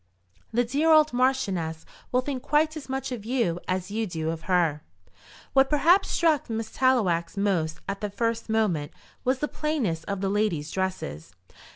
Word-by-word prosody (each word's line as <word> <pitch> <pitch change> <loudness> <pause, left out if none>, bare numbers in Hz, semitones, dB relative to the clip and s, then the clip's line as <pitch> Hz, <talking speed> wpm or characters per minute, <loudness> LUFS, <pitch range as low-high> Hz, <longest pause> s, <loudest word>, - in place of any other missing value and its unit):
The 240 +2 +2
dear 285 +7 +1
old 310 -2 +6
marchioness 195 -11 0 0.3
will 250 - +3
think 260 -1 -4
quite 305 +3 +2
as 300 -4 -8
much 265 0 -3
of 240 -5 -5
you 225 -8 0
as 185 +1 -2
you 220 +1 -1
do 160 -2 -2
of 165 -1 -5
her." 165 -5 +2 0.7
What 270 0 +5
perhaps 340 +7 +4
struck 315 -7 +2
Miss 225 -1 -3
Tallowax 200 -11 +1
most 170 -6 0
at 195 +1 -4
the 210 - -2
first 230 +2 -2
moment 200 -10 0 0.3
was 255 +1 +1
the 295 - -1
plainness 255 - -2
of 200 -1 -3
the 195 - 0
ladies' 195 -8 0
dresses. 180 - -4
220 Hz, 170 wpm, -26 LUFS, 175-265 Hz, 0.7 s, old